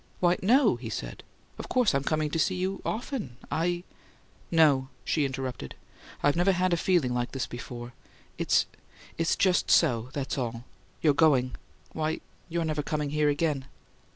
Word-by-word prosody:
"Why, 175 0 +4
no," 235 - +4
he 120 -2 -7
said. - - -5 0.4
"Of - - -7
course 250 -8 +3
I'm 135 0 +1
coming 155 0 0
to 165 - -1
see 185 +3 +2
you 185 +2 -2
often. 220 - -4
I 175 +2 0 0.3
" - - -33 0.2
"No," 150 -5 +4 0.2
she 150 -3 +1
interrupted. 130 - -5 0.5
"I've 145 - +4
never 180 +3 +3
had 185 0 +1
a - - +5
feeling 165 -7 +2
like 120 0 -2
this 135 -2 -1
before. 120 0 -8 0.5
It's - - +3 0.5
it's 165 0 +2
just 185 -2 +2
SO; 120 0 +3
that's 140 -1 -3
all! 115 -1 -3 0.4
You're 150 -3 +5
GOING 135 -5 +3 0.4
why, 155 0 -2 0.3
you're 170 0 -1
never 155 -1 -1
coming 150 -1 -2
here 150 0 +2
again!" 145 -2 0
150 Hz, 165 wpm, -28 LUFS, 130-175 Hz, 0.5 s, a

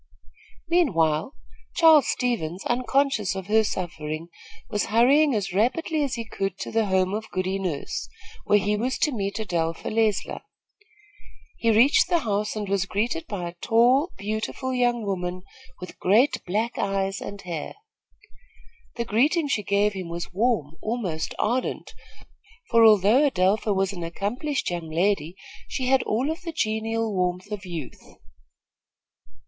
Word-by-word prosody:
Meanwhile, 185 - +1 0.4
Charles 320 -4 +6
Stevens, 195 -8 -2
unconscious 255 -4 +1
of 190 -1 -5
her 220 +2 +3
suffering, 165 -4 -4 0.4
was 210 - -1
hurrying 270 +5 +4
as 195 -3 -2
rapidly 300 - +1
as 275 -2 -2
he 230 -1 -5
could 195 -4 -3
to - - -6
the 225 -2 +1
home 190 0 +1
of 220 +1 -4
Goody 185 +1 -2
Nurse, 175 -7 -4 0.3
where 205 - +4
he 205 +1 +1
was 250 +5 -1
to 300 - +1
meet 200 -5 -3
Adelpha 165 -6 -2
Leisler. 220 -2 0 1.1
He 230 - 0
reached 240 +10 +5
the 350 - +4
house 210 -3 -1
and 210 -1 -3
was 195 0 0
greeted 240 - -2
by 185 -5 -4
a 170 - -7
tall, 250 +9 +3
beautiful 220 +5 -3
young 240 -2 +1
woman, 180 -2 -3 0.4
with 180 - -10
great, 220 +10 +3
black 220 +6 -1
eyes 195 0 -1
and 200 - -7
hair. 170 -4 -5 1.2
The 235 - -2
greeting 290 - +2
she 220 - +1
gave 205 +1 +1
him 185 -3 -6
was 170 +1 -5
warm, 185 - 0
almost 200 -9 -3
ardent, 250 +4 -1 0.8
for, 230 -1 +6
although 220 +6 +6
Adelpha 205 -1 +1
was 195 0 0
an 175 - -7
accomplished 210 - -2
young 170 -2 -4
lady, 170 0 0 0.3
she 260 - -3
had 265 -1 +4
all 250 +8 0
of 325 +3 -6
the 335 -2 -6
genial 220 -3 -1
warmth 180 +2 -1
of 205 -2 -5
youth. 165 -7 -7
210 Hz, 145 wpm, -25 LUFS, 185-245 Hz, 1.2 s, Charles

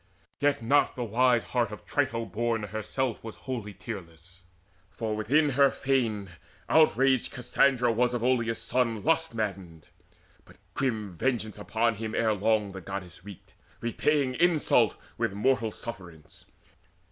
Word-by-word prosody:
Yet 145 -4 +1
not 140 +6 +3
the 125 - -3
wise 120 +1 +3
heart 120 -3 0 0.2
Trito 130 -5 -1
born 115 +2 -1
herself 110 +4 -3
Was 110 -1 -7
wholly 115 -7 -6
tearless; 90 -4 -9 0.5
for 110 +2 -3
within 145 +8 +2
her 140 +1 +4
fane 115 -10 -1 0.4
Outraged 135 -5 +3
Cassandra 125 0 +2
was 120 +2 +1
of 120 - -2
Oileus 120 -2 +1
son 115 -4 -1
Lust 165 -4 +1
maddened. 95 -7 -5 0.5
But - - -19 0.2
grim 110 -8 -2
vengeance 110 -1 -1
upon 110 +2 0
him 110 0 -4
Ere 110 -1 +2
long 105 0 +1
the 95 0 -8
Goddess 90 -2 -7
wreaked, 100 -2 -12 0.3
repaying 130 +3 +1
insult 170 -3 +3 0.2
With - - 0
mortal 115 +2 +1
sufferance. 90 -9 -10
115 Hz, 135 wpm, -28 LUFS, 105-130 Hz, 0.5 s, her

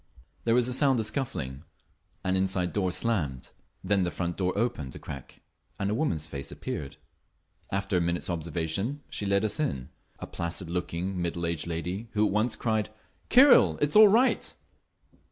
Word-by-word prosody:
There 115 0 +3
was 125 -1 +3
a 125 - -1
sound 135 -2 +3
of 110 - 0
scuffling; 70 - -3 0.6
an 95 -1 +1
inside 95 -1 0
door 95 -3 0
slammed; 85 - -2 0.3
then 100 +1 +2
the 90 - +1
front 85 -1 -3
door 90 -1 0
opened 100 - -2
a - - -6
crack 70 -3 -9 0.4
and 100 +1 -1
a - - +1
woman's 110 - 0
face 70 -3 -7
appeared. 70 -2 -5 0.7
After 100 -1 0
a - - +2
minute's 85 +1 -1
observation 85 - -2
she 105 - -3
led 100 +2 +2
us 110 - -1
in—a 70 - -5
placid 85 0 -5
looking, 90 +1 -2
middle 85 0 -2
aged 85 -1 -2
lady 90 +6 -3
who 105 0 +3
at - - +1
once 110 +3 +1
cried, 110 -2 0 0.4
"Kyril, 265 +2 +7
it's 145 0 +1
all 215 0 +10
right!" 230 +6 +3
95 Hz, 170 wpm, -28 LUFS, 85-115 Hz, 0.7 s, all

